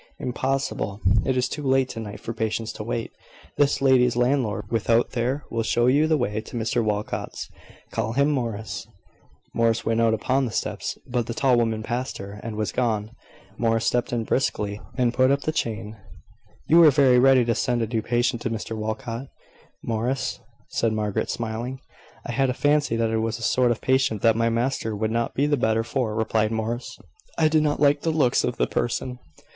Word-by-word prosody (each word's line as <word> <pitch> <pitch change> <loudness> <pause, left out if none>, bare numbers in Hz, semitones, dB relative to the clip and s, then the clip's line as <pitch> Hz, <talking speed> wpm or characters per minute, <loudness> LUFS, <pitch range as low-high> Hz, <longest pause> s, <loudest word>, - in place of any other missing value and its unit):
"Impossible. 125 -6 -2 0.3
It 130 -1 +1
is 125 - +2
too 150 - -5
late 135 -2 +2
to - - -6
night 105 -2 -7
for 115 - -5
patients 110 0 -2
to - - -6
wait. 115 0 -3 0.5
This 140 -1 +2
lady's 125 -3 +4
landlord, 120 -4 +1
without 115 +1 +2
there, 130 +5 -1
will 115 - 0
show 120 +2 +1
you 145 +5 +4
the 155 -1 +3
way 105 -4 -1
to 120 - -8
Mr 115 0 0
Walcot's. 105 -1 -3 0.4
Call 110 0 -2
him, 140 +4 +3
Morris." 110 -7 -3 0.7
Morris 115 -1 +1
went 115 0 +1
out 115 -1 +3
upon 130 +5 +1
the 120 - -4
steps, - - -3
but 120 -2 -2
the 115 - -4
tall 130 -1 +3
woman 115 -2 0
passed 125 +3 -3
her, 100 +1 -8
and 115 -2 -5
was 105 -4 -2
gone. 110 -2 -1 0.5
Morris 115 -1 +1
stepped 120 0 +1
in 120 -2 -1
briskly, 105 -4 -1 0.2
and 125 -2 +2
put 130 +1 +4
up 140 +1 +2
the 155 - -1
chain. 110 -6 -3 0.7
"You 165 - +5
were 165 -2 +9
very 135 -3 +5
ready 130 -1 +5
to 115 - +2
send 120 0 0
a - - -1
new 110 0 -1
patient 120 +1 0
to - - -2
Mr 110 0 -4
Walcot, 110 +4 -4 0.6
Morris," 125 +4 -2 0.3
said 115 -1 0
Margaret, 105 -2 -1
smiling. 115 +3 -4 0.5
"I - - -4
had 135 -1 +1
a 125 - -1
fancy 145 -4 +2
that 115 -1 0
it 110 - +1
was 110 +1 -1
a 120 - -8
sort 125 0 +3
of 120 - -1
patient 130 -5 +1
that 115 -1 +5
my 115 0 +2
master 115 -1 -1
would 110 +1 -1
not 115 0 -1
be 140 - +2
the 145 -1 +2
better 110 -2 +1
for," 115 -2 -2
replied 110 0 +1
Morris. 115 +2 -3 0.4
"I 160 - +4
did 155 0 +3
not 150 -1 0
like 145 0 +4
the 165 - 0
looks 150 -6 +2
of 125 - -2
the - - +2
person." 125 +1 -2
120 Hz, 200 wpm, -24 LUFS, 110-130 Hz, 0.7 s, were